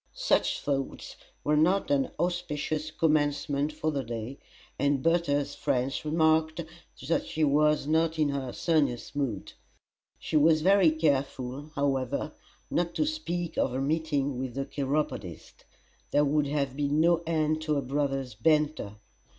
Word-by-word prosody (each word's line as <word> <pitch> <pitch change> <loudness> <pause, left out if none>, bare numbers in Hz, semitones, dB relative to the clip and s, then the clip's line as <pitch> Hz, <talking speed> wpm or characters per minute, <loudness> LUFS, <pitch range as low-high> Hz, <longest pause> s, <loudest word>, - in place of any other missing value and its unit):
Such - - +1
thoughts 135 -2 -3 0.3
were 150 - +2
not 175 +3 +2
an 135 -2 +2
auspicious 155 -3 -2
commencement 145 -2 +1
for 155 +1 -2
the 140 -2 -2
day, 115 +3 -6 0.4
and 140 -2 +1
Bertha's 160 -4 +1
friends 130 +2 -1
remarked 160 +1 +2 0.5
that 165 - 0
she 155 - -1
was 150 0 +3
not 160 +1 +1
in 155 -2 +2
her 135 -3 -3
sunniest 140 -6 0
mood. 130 -9 -3 0.6
She 155 - -1
was 155 +1 +4
very 190 -2 +6
careful, 140 -3 -1
however, 140 0 -1 0.4
not 170 0 0
to 305 - +1
speak 175 - -3
of 125 - +1
her 130 - -1
meeting 145 -3 0
with 130 -2 -4
the 135 0 -2
chiropodist; 135 - -4 0.4
there 145 - +3
would 145 0 +1
have 140 -2 -1
been 145 +1 0
no 170 +1 +4
end 155 -1 +1
to 155 -1 0
her 140 - +1
brother's 135 -1 -2
banter. 150 -3 +1
150 Hz, 140 wpm, -28 LUFS, 135-160 Hz, 0.6 s, very